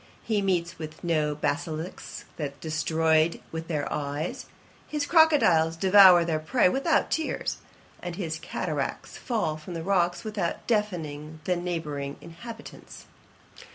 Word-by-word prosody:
He 215 Hz, -3 st, 0 dB
meets 175 Hz, -3 st, -1 dB
with 155 Hz, -1 st, -8 dB
no 155 Hz, -3 st, +1 dB
basilisks 150 Hz, +3 st, -4 dB
that 140 Hz, -3 st, -5 dB
destroy 160 Hz, +1 st, +1 dB
with 160 Hz, 0 st, -5 dB
their 150 Hz, -4 st, -1 dB
eyes, 145 Hz, +2 st, -3 dB, 0.4 s
his 300 Hz, -1 st, -2 dB
crocodiles 225 Hz, -, +4 dB
devour 185 Hz, -2 st, +7 dB
their 160 Hz, -2 st, 0 dB
prey 210 Hz, +8 st, +3 dB
without 275 Hz, -, +1 dB
tears, 320 Hz, -, -1 dB, 0.4 s
and 175 Hz, -1 st, -5 dB
his 160 Hz, -4 st, -3 dB
cataracts -, -, -4 dB
fall 190 Hz, -11 st, -1 dB
from 165 Hz, +3 st, -8 dB
the 165 Hz, -, -4 dB
rocks 175 Hz, -2 st, +1 dB
without 210 Hz, -6 st, -3 dB
deafening 160 Hz, -9 st, -2 dB
the 180 Hz, -, +1 dB
neighbouring 155 Hz, -5 st, -4 dB
inhabitants. 225 Hz, +8 st, -11 dB
170 Hz, 125 wpm, -27 LUFS, 155-195 Hz, 0.4 s, devour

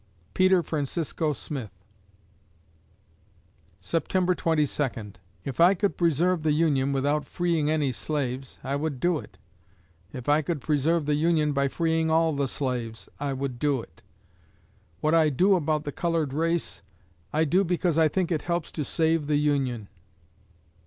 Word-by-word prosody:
PETER 185 Hz, -1 st, +4 dB
FRANCISCO 155 Hz, +1 st, -2 dB
SMITH 135 Hz, -5 st, -6 dB, 2.1 s
September 180 Hz, +3 st, 0 dB
Twenty 160 Hz, -3 st, +1 dB
Second 115 Hz, -9 st, -4 dB, 0.3 s
If 135 Hz, 0 st, -5 dB
I 175 Hz, +4 st, +6 dB
could 200 Hz, +2 st, 0 dB
preserve 170 Hz, +1 st, +2 dB
the 155 Hz, -1 st, +2 dB
Union 145 Hz, -4 st, +2 dB
without 145 Hz, +2 st, +1 dB
freeing 170 Hz, -4 st, 0 dB
any 150 Hz, -4 st, +1 dB
slaves, 130 Hz, -1 st, -4 dB
I 135 Hz, +1 st, -2 dB
would 145 Hz, -3 st, -3 dB
do 175 Hz, 0 st, +1 dB
it; -, -, -13 dB, 0.7 s
if 125 Hz, -2 st, -8 dB
I 150 Hz, +1 st, +4 dB
could 160 Hz, +1 st, -2 dB
preserve 155 Hz, +3 st, +1 dB
the 150 Hz, -, +1 dB
Union 155 Hz, 0 st, +2 dB
by 140 Hz, 0 st, +1 dB
freeing 160 Hz, +2 st, 0 dB
all 160 Hz, 0 st, +3 dB
the 140 Hz, -1 st, 0 dB
slaves, 125 Hz, -4 st, -4 dB
I 140 Hz, -1 st, -2 dB
would 130 Hz, -2 st, -4 dB
do 145 Hz, -2 st, +1 dB
it. 80 Hz, -8 st, -13 dB, 1.0 s
What 155 Hz, -, +2 dB
I 160 Hz, -2 st, +5 dB
do 185 Hz, +9 st, +3 dB
about 155 Hz, -4 st, +1 dB
the 145 Hz, -, -4 dB
colored 165 Hz, -3 st, -1 dB
race, 165 Hz, +2 st, -1 dB, 0.5 s
I 155 Hz, +1 st, +2 dB
do 180 Hz, +5 st, +3 dB
because 175 Hz, -2 st, 0 dB
I 160 Hz, -, +5 dB
think 180 Hz, +3 st, -1 dB
it 155 Hz, -3 st, 0 dB
helps 170 Hz, -2 st, -2 dB
to 155 Hz, -, -3 dB
save 160 Hz, +1 st, 0 dB
the 150 Hz, -1 st, +2 dB
Union. 135 Hz, -7 st, 0 dB
150 Hz, 150 wpm, -26 LUFS, 140-165 Hz, 2.1 s, I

